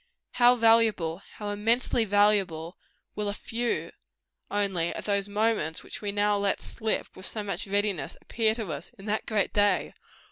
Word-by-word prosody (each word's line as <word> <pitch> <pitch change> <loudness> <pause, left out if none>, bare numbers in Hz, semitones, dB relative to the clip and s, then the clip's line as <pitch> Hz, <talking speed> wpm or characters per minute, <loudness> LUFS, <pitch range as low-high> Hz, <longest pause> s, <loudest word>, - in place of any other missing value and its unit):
How 245 0 +5
valuable 225 -7 +3
how 210 -1 -5
immensely 225 +3 +2
valuable 200 -5 +2 0.4
will 210 -1 -2
a 205 - -3
few, 235 +2 -2 0.6
only, 195 -5 0
of - - -6
those 200 -1 0
moments 205 -6 0
which - - -9
we 205 -1 -2
now 205 0 +2
let 200 0 0
slip 220 -1 -3
with 185 - -4
so 215 - -2
much 200 -1 -4
readiness, 200 -7 -1
appear 220 -1 0
to 220 -7 -4
us 150 +5 -6
in 195 - -12
that 215 0 0
great 210 -3 0
day! 205 -1 +2
205 Hz, 165 wpm, -27 LUFS, 195-220 Hz, 0.6 s, How